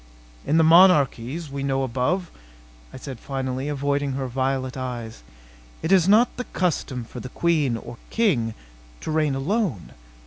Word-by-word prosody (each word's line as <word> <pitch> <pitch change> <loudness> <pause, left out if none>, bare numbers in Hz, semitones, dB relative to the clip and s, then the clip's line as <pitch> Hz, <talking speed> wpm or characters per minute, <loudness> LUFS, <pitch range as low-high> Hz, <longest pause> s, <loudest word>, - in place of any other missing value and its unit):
"In 155 - +3
the 165 - +5
monarchies 160 -4 +4
we 140 0 -4
know 135 -1 0
above," 130 +9 -1 0.6
I - - -9
said 130 -2 -8
finally, 130 +1 -3
avoiding 145 -1 -1
her 135 0 -3
violet 130 +1 -2
eyes, 120 - -6 0.6
"it 160 - -1
is 190 -1 +5
not 230 +5 +4
the 250 - -4
custom 145 -8 -2
for - - -9
the 130 - -7
queen 150 -6 +1
or 115 - -9
king 125 - +1 0.5
to - - -4
reign 155 -3 +1
alone. 155 - -1
140 Hz, 150 wpm, -24 LUFS, 130-165 Hz, 0.6 s, the